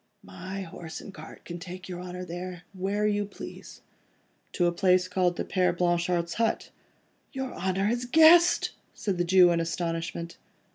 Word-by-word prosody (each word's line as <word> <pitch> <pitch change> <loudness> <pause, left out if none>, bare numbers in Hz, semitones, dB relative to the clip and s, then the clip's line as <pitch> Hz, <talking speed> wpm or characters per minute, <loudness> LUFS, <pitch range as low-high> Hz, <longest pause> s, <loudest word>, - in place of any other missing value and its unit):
"My 185 - -7
horse 165 -2 -8
and 195 - -10
cart 155 -1 -12
can 175 0 -6
take 180 +1 -8
your 180 -1 -6
Honour 180 0 -6
there, 180 +1 -6
where 200 +3 -1
you 205 -1 +1
please." 205 - -10 0.7
"To 175 - +1
a 175 - +3
place 180 +1 +3
called 180 -1 +1
the - - -2
Père 180 -2 +1
Blanchard's 175 -1 +1
hut?" 225 - 0 0.6
"Your 265 -1 -4
Honour 190 +1 -1
has 240 +3 0
guessed?" 320 +6 +6 0.2
said 195 -4 -2
the - - +3
Jew 180 0 +6
in 170 - +1
astonishment. 170 0 -3
180 Hz, 160 wpm, -27 LUFS, 175-195 Hz, 0.7 s, guessed